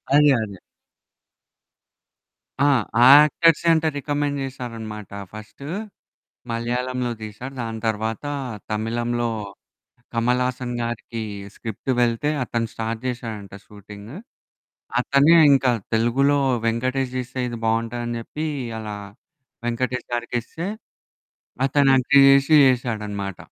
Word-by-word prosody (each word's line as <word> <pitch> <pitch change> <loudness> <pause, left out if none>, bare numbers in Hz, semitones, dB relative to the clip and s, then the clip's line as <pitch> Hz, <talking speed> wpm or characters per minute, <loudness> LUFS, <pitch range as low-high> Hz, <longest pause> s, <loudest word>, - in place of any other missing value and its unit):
అదే, 150 0 +6
అదే. 100 -3 -6 2.0
ఆ! - - +5 0.4
ఆ - - +8 0.2
యాక్టర్సే 165 +2 +3
అంట 160 0 +1
రికమెండ్ 145 0 -1
చేసారనమాట. 115 -5 -7 0.2
ఫస్ట్ 110 +5 -11 0.9
మలయాళంలో 125 +1 -2
తీసారు. 110 +5 -8
దాని 115 -1 -4
తర్వాత 110 +2 -2 0.5
తమిళంలో 120 +2 -1 0.8
కమల్ 125 +2 +1
హాసన్ 125 -1 -3
గారికి 115 -1 -4 0.3
స్క్రిప్ట్ 110 +4 -7
వెళ్తే, 120 +4 +1
అతను 115 -1 -2
స్టార్ట్ 115 0 -4
జేశాడంట 115 -5 -5
షూటింగ్. 105 +2 -12 0.9
అతనే 140 +4 +5 0.2
ఇంకా 135 -2 +4 0.2
తెలుగులో 135 +6 +3 0.3
వెంకటేష్ 130 +3 -1
తీస్తే 130 +1 -5
ఇది 120 -1 -6
బావుంటాదని 115 +1 -1
చెప్పి 150 +7 -5 0.3
అలా 105 -1 -5 0.7
వెంకటేష్ 125 +1 -2
గారికి 120 0 -2
ఇస్తే, 165 +8 -6 1.0
అతను 140 0 +3
యాక్ట్ 130 0 0
జేశి 135 +2 +5
యేశాడనమాట. 105 -6 -2
120 Hz, 100 wpm, -23 LUFS, 110-135 Hz, 2.0 s, ఆ